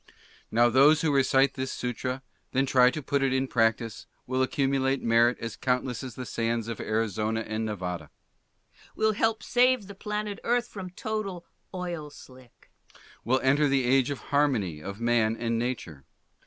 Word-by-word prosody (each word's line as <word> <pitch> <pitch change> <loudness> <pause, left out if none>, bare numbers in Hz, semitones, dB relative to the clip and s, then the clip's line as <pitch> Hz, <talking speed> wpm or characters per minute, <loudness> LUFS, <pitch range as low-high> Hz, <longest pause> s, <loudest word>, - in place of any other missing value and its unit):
Now 120 +2 +4
those 145 +5 +5
who 155 -3 +1
recite 135 0 +3
this 130 -1 -4
Sutra 125 +1 -3
and 130 - -9 0.3
then 135 +1 +2
try 125 -1 +5
to 150 +3 -5
put 140 0 0
it 135 -1 +2
in 130 0 +1
practice 115 -2 0 0.2
willl 130 +1 0
accumulate 135 0 +1
merit 115 +1 +4
as 115 -2 -5
countless 125 0 -1
as 125 -4 -7
the 125 - -6
sands 115 -1 -2
of 115 -2 -5
Arizona 110 0 -1
and 110 0 -3
Nevada. 90 -7 -4 0.9
Will 220 0 +2
help 225 +1 0
save 250 -2 +3
the 200 - -9
planet 210 +1 -4
Earth 240 0 +1
from 190 -3 -7
total 195 -2 -4 0.3
oil 175 -5 -5
slick. 130 -4 -17 0.5
Will 130 +3 +1
enter 140 +3 +3
the 135 -1 +2
age 130 +1 +3
of 140 - -3 0.2
harmony 115 - +1
of 100 +5 -7
man 115 -1 +2
and 115 -1 -1
nature. 110 - -4
130 Hz, 170 wpm, -27 LUFS, 115-150 Hz, 0.9 s, those